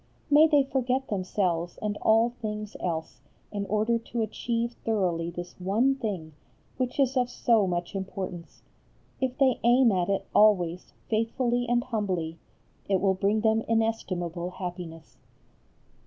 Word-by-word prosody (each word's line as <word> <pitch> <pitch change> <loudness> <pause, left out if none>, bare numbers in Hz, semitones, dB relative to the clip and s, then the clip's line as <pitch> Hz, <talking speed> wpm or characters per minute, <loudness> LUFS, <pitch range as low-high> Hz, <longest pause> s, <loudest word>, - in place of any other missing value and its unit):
May 300 +2 +8
they 290 -3 +4
forget 265 0 -1
themselves 180 -3 -1
and 210 -1 -2
all 225 +2 +4
things 210 -1 -4
else 160 -7 -4 0.3
in 200 -1 -3
order 215 +3 +1
to 230 0 -3
achieve 235 +2 -2
thoroughly 180 -7 0
this 175 +1 -7
one 215 +9 +2
thing, 195 - -4 0.4
which 255 +1 -2
is 270 -1 +3
of 250 -1 +2
so 230 -4 +2
much 175 0 -2
importance. 190 -3 -6 0.6
If 260 -1 -1
they 265 -3 +3
aim 240 0 +5
at 180 -2 0
it 195 - 0
always 180 -5 +3
faithfully 240 +2 0
and 240 0 +2
humbly, 185 -9 -2 0.5
it 195 -2 +3
will 195 0 +3
bring 200 +3 +1
them 220 0 +3
inestimable 185 -7 -1
happiness. 175 -7 -7
210 Hz, 140 wpm, -27 LUFS, 180-235 Hz, 0.6 s, May